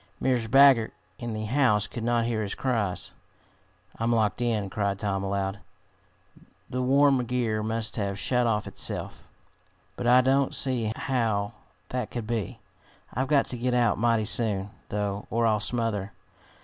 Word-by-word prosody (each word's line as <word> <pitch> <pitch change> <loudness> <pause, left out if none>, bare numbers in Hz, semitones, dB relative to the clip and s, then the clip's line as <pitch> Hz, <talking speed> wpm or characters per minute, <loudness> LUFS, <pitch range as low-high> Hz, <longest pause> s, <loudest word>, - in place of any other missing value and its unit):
Mrs. 120 -4 0
Baggert, 135 -3 +6 0.3
in 120 -1 -4
the 110 0 -3
house, 110 -4 +2
could 115 +2 -6
not 120 0 +1
hear 115 -2 -1
his 100 -2 -3
cries. 110 -8 -1 0.8
"I'm 115 +1 0
locked 110 0 +1
in!" 110 -4 0
cried 100 0 -1
Tom 100 -2 -2
aloud. 100 0 -2 1.1
"The 130 - -3
worm 135 0 +4
gear 115 -3 -1
must 110 +1 -2
have 100 -2 -2
shut 125 +3 +1
of 105 -2 0
itself. - - -4 0.7
But 120 - -3
I 125 +1 +7
don't 135 +1 +2
see 120 -5 0
how 110 -6 -1 0.4
that 125 0 -3
could 120 -3 -5
be. 115 +1 -3 0.5
I've 130 +3 -1
got 140 -1 +3
to 125 - -2
get 125 +1 0
out 120 -4 +2
mighty 115 -1 +2
soon, 105 -3 0 0.2
though, 100 0 -3
or 115 +1 +1
I'll 110 -2 +3
smother. 110 -2 -2
115 Hz, 155 wpm, -27 LUFS, 105-125 Hz, 1.1 s, I